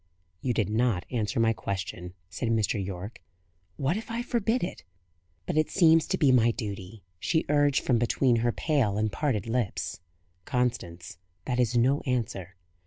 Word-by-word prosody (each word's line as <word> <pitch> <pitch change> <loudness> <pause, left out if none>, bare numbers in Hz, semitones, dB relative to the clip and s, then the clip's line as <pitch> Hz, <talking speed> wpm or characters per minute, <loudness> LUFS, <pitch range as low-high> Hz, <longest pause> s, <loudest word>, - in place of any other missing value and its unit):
"You 130 - 0
did 105 - +1
not 110 -4 +1
answer 110 -4 -1
my 115 0 +4
question," 90 -3 -5
said 95 +6 -3
Mr. 110 -2 +1
Yorke. 95 +3 -7 0.6
"What 140 +8 0
if 225 - -7
I 230 +1 -2
forbid 235 0 0
it?" 175 - -5 0.6
"But 155 - +1
it 155 - +1
seems 165 -3 +5
to - - 0
be 140 -3 +4
my 120 -2 +5
duty," 100 -3 -5 0.2
she 160 - +1
urged 145 -1 +3
from 120 -3 +2
between 120 +1 +2
her 120 +1 +1
pale 125 -9 +1
and 110 0 0
parted 120 -2 -1
lips. 115 -3 -2 0.4
"Constance, 90 -10 -2 0.3
that 125 -1 -1
is 120 0 +2
no 130 +4 +3
answer." 100 -7 -2
120 Hz, 165 wpm, -28 LUFS, 100-140 Hz, 0.6 s, seems